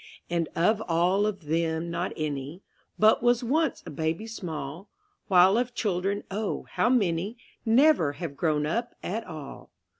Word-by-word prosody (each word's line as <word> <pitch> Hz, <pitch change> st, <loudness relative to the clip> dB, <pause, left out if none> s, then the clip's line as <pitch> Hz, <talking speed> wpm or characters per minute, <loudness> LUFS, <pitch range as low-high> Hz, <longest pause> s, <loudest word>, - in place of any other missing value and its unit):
And 170 Hz, -2 st, 0 dB
of 215 Hz, +6 st, +2 dB
all 180 Hz, +5 st, +2 dB
of 195 Hz, -6 st, -4 dB
them 165 Hz, +1 st, -1 dB
not 175 Hz, +2 st, -2 dB
any 150 Hz, +3 st, -4 dB, 0.3 s
But 215 Hz, +1 st, +5 dB
was 240 Hz, +1 st, +3 dB
once 305 Hz, +6 st, 0 dB
a -, -, -7 dB
baby 160 Hz, +7 st, -2 dB
small; 175 Hz, -4 st, -6 dB, 0.4 s
While 190 Hz, +3 st, +6 dB
of 245 Hz, 0 st, -2 dB
children, 200 Hz, -1 st, -1 dB
oh, 210 Hz, +1 st, -2 dB
how -, -, +2 dB
many 200 Hz, -2 st, +1 dB, 0.3 s
Never 230 Hz, -, +4 dB
have 155 Hz, -2 st, -6 dB
grown 150 Hz, -1 st, +1 dB
up 235 Hz, +10 st, -2 dB
at 225 Hz, +5 st, -3 dB
all. 155 Hz, -4 st, -9 dB
180 Hz, 150 wpm, -27 LUFS, 160-220 Hz, 0.4 s, While